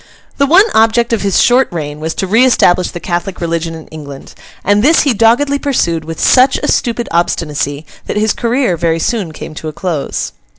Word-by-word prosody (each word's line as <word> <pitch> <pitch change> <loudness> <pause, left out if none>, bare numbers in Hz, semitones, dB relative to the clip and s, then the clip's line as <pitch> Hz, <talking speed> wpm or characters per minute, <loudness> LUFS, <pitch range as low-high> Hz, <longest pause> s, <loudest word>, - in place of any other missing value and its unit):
The 280 - +3
one 365 +8 +6
object 230 +2 +2
of 225 - 0
his 200 -2 +1
short 250 +2 +4
reign 150 -3 -5
was 160 +1 -4
to - - -2
re 220 +6 +3
establish 185 -8 +3
the 175 - -7
Catholic 175 +2 -4
religion 165 -1 -3
in 160 - -10
England; 145 -3 -10 0.3
and 205 +1 +2
this 310 +7 +4
he 280 -4 +1
doggedly 240 +6 +2
pursued 170 - -1
with 165 0 -7
such 260 +1 +4
a - - -1
stupid 235 0 -1
obstinacy, 150 -3 -2 0.2
that - - -3
his 215 0 +1
career 240 -5 0
very 165 0 0
soon 195 -2 -2
came 155 - -9
to 155 - -7
a 155 - -5
close. 165 -4 -3
190 Hz, 200 wpm, -13 LUFS, 165-240 Hz, 0.3 s, one